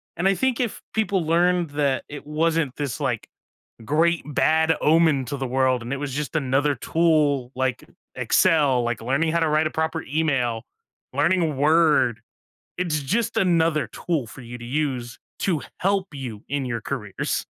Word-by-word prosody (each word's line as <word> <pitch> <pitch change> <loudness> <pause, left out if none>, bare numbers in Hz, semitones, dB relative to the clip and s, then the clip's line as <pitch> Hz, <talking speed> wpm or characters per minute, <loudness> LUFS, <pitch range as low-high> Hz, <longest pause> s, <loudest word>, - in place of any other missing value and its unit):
and 175 +3 +1
I 195 - +4
think 260 +4 0
if 240 -4 -2
people 200 -5 +1
learned 175 0 +2
that 145 -2 0
it 145 -1 -8
wasn't 155 -2 0
this, 145 -4 -3
like, - - -2 0.6
great 165 +6 +2
bad 160 +2 +2
omen 155 -4 +3
to 140 - -4
the 135 -1 -3
world 130 -1 +1
and 120 +2 -6
it 140 - -1
was 140 -2 -4
just 150 +3 -4
another 140 0 +1
tool 150 -4 +1
like 130 0 -1 0.3
Excel, 145 -8 +3
like 120 -1 -2
learning 140 +7 +1
how 170 - +1
to 160 -2 +1
write 155 +1 +2
a - - -6
proper 160 0 -2
email, 135 -7 0 0.5
learning 165 -6 +1
Word, 150 -6 +3 0.6
it's 165 -4 -1
just 215 - -1
another 165 - +2
tool 150 0 -3
for 135 - -11
you 120 0 -8
to 120 - -8
use 125 -3 -2 0.2
to 170 -7 0 0.2
help 195 0 +1
you 125 -7 -7
in 145 -1 -1
your 120 -2 -3
careers. 110 -8 -3
150 Hz, 165 wpm, -23 LUFS, 130-165 Hz, 0.6 s, I